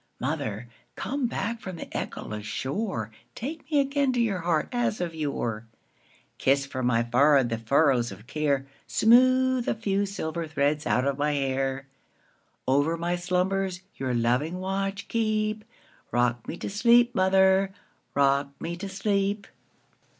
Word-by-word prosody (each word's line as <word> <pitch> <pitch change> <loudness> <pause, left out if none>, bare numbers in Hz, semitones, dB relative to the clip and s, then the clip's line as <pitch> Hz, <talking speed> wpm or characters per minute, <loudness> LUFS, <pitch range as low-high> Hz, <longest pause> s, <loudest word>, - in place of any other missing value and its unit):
Mother, 130 -6 -3 0.3
come 275 -1 -2
back 230 +1 -3
from 185 -3 -6
the - - -6
echoless 105 0 -5
shore, 130 - -3 0.2
Take 285 +4 -6
me 300 -2 +3
again 275 -1 +2
to 245 - 0
your 215 -6 +1
heart 165 -2 0
as 240 -3 0
of 175 -2 -2
yore; 120 -8 -3 0.7
Kiss 140 +1 +3
from 130 -2 -2
my 115 -1 +3
forehead 130 +2 +4
the 115 0 -2
furrows 125 -1 +2
of 100 +3 -11
care, 140 -1 0 0.2
Smooth 255 +2 +4
the - - 0
few 200 -2 0
silver 170 -4 -4
threads 150 0 0
out 125 - +2
of 140 0 -1
my 150 +1 +1
hair; 135 -1 -1 0.8
Over 145 +5 +2
my 170 +1 -1
slumbers 185 +1 -1
your 130 -2 -2
loving 125 +9 +1
watch 195 +1 -3
keep;—Rock 215 - -2
me 170 - -5
to - - -5
sleep, 240 +3 +4
mother,—rock 190 - +1
me 170 +1 -4
to 195 +2 -6
sleep! 200 +1 0
170 Hz, 140 wpm, -27 LUFS, 135-205 Hz, 0.8 s, forehead